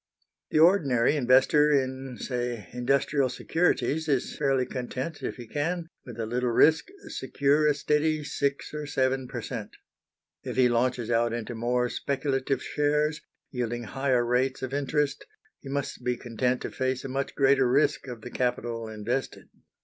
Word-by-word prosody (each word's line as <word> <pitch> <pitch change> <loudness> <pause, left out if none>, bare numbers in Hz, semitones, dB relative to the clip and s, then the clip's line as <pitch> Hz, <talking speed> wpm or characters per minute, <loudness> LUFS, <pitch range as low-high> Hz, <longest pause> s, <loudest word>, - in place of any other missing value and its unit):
The - - 0
ordinary 155 -8 +4
investor 135 +3 +4
in, 130 -2 -1
say, 120 -6 -3
industrial 135 +2 +1
securities 160 +2 0
is 135 -4 0
fairly 135 -3 +1
content 130 +5 -5
if - - -3
he 120 - -9
can, 165 +6 -2 0.2
with 120 -2 -9
a 115 - -1
little 125 +2 -1
risk, 155 +7 +4 0.2
secure 140 +3 +1
a 150 - +3
steady 150 +1 +1
six 140 -1 -2
or 150 -1 -4
seven 130 -2 0
per 120 -2 -6
cent. 115 -5 -6 0.7
If - - -5
he 130 -1 +4
launches 120 0 0
out 115 0 +2
into 120 0 -4
more 125 +2 0
speculative 135 0 -1
shares, 150 +1 0 0.3
yielding 120 -2 -3
higher 130 0 0
rates 130 +2 0
of 130 0 -4
interest, 145 0 0 0.4
he 135 - -10
must 140 -2 -3
be 125 0 0
content 125 +2 -1
to - - -4
face 130 0 -2
a - - -2
much 135 +1 -3
greater 135 -2 +4
risk 135 +1 +2
of 120 -3 -7
the 125 - -8
capital 120 -2 -2
invested. 110 +5 -4
130 Hz, 155 wpm, -27 LUFS, 120-145 Hz, 0.7 s, ordinary